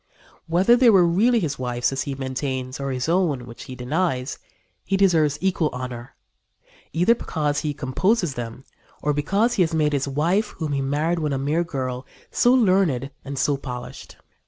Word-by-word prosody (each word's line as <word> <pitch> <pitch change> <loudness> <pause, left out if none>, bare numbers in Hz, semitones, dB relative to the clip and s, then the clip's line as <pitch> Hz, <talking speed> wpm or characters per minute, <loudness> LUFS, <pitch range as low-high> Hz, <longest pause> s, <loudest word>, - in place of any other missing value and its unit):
Whether 185 +8 +4
they 245 -1 +5
were 190 -5 +6
really 220 +8 +3
his 155 -9 -3
wife's, 125 -1 -1
as 135 - -2
he 140 - -3
maintains, 130 -1 -4
or 140 0 -3
his 130 0 -2
own, 165 -8 +1
which 120 -1 -10
he 130 - -8
denies, 130 +1 -2 0.4
he 195 - 0
deserves 160 -7 +3
equal 180 -4 +1
honor, 125 -1 -7 0.8
either 180 +8 +4
because 150 -10 -2
he 150 -2 -3
composes 160 - 0
them 120 +1 -6 0.4
or 150 - +2
because 195 +11 +1
he 200 - +1
has 165 -2 +1
made 150 -1 +2
his 140 -1 0
wife, 170 +10 0
whom 155 -3 -3
he 140 -1 0
married 150 +5 0
when 150 -3 -1
a - - 0
mere 150 +5 0
girl, 130 -5 -4 0.2
so 245 - +3
learned 185 - +2
and 140 0 -6
so 140 +2 +1
polished." 125 -3 -8
150 Hz, 180 wpm, -23 LUFS, 130-180 Hz, 0.8 s, were